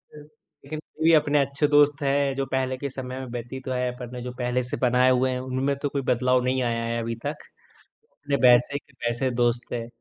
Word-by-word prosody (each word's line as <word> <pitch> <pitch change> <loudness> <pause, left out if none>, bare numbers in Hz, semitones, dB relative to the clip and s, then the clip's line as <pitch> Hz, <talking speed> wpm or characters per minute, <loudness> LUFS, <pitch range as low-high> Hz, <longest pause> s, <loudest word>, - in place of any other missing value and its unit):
Yes 150 0 -12 0.4
लेकिन 155 +2 -6 0.2
अभी 160 +1 +4
अपने 150 -1 +4
अच्छे 140 +2 +1
दोस्त 145 0 +4
हैं 140 0 +1
जो 135 0 -1
पहले 130 0 -1
के 140 +1 -4
समय 130 0 -6
में 130 - -5
व्यतीत 130 +3 -7
है 125 -1 0
अपन 125 -1 -8
ने 125 - -6
जो 125 0 -5
पहले 125 +1 0
से 125 - -4
बनाए 125 0 +3
हुए 130 +1 +2
हैं 125 - -2
उनमें 130 +2 -1
तो 145 - 0
कोई 140 0 -2
बदलाव 125 +1 +3
नहीं 130 +1 0
आया 115 -1 -1
है 115 0 -2
अभी 115 0 -3
तक। 150 +1 -2 0.8
अपने 145 -1 -2
वैसे 125 +3 +5
के 140 - -25
वैसे 120 +2 0
दोस्त 120 0 0
हैं। 115 -1 -3
130 Hz, 220 wpm, -25 LUFS, 125-140 Hz, 0.8 s, वैसे